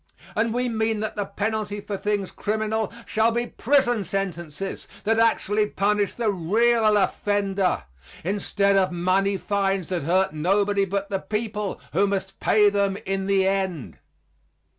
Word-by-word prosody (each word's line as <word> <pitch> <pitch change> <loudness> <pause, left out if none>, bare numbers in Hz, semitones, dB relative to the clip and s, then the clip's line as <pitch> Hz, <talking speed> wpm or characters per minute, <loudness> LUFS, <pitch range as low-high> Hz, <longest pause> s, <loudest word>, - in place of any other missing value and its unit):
And 225 +1 +1
we 250 +2 0
mean 220 -2 0
that 215 - -3
the 205 -2 -2
penalty 205 0 -2
for 205 0 -5
things 205 -1 -2
criminal 220 0 -1
shall 220 +1 +2
be 240 +1 0
prison 245 -4 +1
sentences 185 -1 -4 0.2
that 225 +2 +2
actually 215 -2 +2
punish 205 0 0
the 230 -3 0
real 215 +4 +3
offender, 195 -1 0 0.4
instead 200 +1 +1
of 190 -1 +2
money 185 +3 +1
fines 195 -2 -1
that 180 -2 -1
hurt 180 +3 +1
nobody 200 +5 +2
but 200 +1 -3
the 195 - 0
people, 210 -1 -3
who 195 +5 +3
must 195 -1 -3
pay 210 -1 +4
them 200 -1 +1
in 195 0 -2
the 195 -1 +3
end. 190 -7 -2
200 Hz, 145 wpm, -24 LUFS, 195-215 Hz, 0.4 s, pay